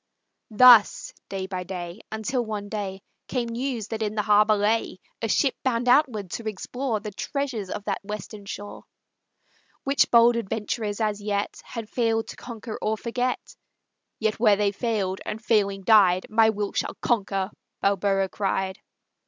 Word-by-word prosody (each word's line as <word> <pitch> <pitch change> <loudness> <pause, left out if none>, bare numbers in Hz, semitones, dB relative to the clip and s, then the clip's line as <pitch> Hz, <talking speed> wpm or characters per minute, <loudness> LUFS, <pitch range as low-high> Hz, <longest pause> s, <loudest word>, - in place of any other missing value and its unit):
Thus 235 -1 +6 0.2
day 195 -1 -3
by 185 -1 -4
day, 175 +1 -6
until 240 +4 -1
one 210 -2 -5
day 195 -2 -4 0.2
Came 245 -3 -2
news 235 -2 -3
that 225 -1 -4
in 215 0 -1
the 210 - 0
harbor 210 0 +5
lay 210 -1 0 0.2
A 225 - 0
ship 270 +5 +2
bound 245 -2 0
outward 245 - +3
to 230 - -5
explore 230 +3 -3
The 210 0 -7
treasures 240 -2 -3
of 205 - -5
that - - -3
western 210 0 -7
shore, 205 +1 -8 1.0
Which 275 +1 +2
bold 235 0 +6
adventurers 215 -1 -3
as 210 -1 0
yet 205 -1 -2
Had 230 -3 -7
failed 225 -1 0
to - - -7
conquer 230 -2 -8
or 220 +1 0
forget; 245 +3 -3 0.6
"Yet 220 0 -1
where 215 -3 +5
they 200 0 +1
failed, 200 -3 -2
and 215 - -5
failing 200 -4 +1
died, 190 -3 +5
My 220 0 +5
will 205 -2 -2
shall - - -2
conquer!" 195 -4 0 0.3
Balboa 195 -1 +1
cried. 190 -1 -2
215 Hz, 155 wpm, -25 LUFS, 200-230 Hz, 1.0 s, Thus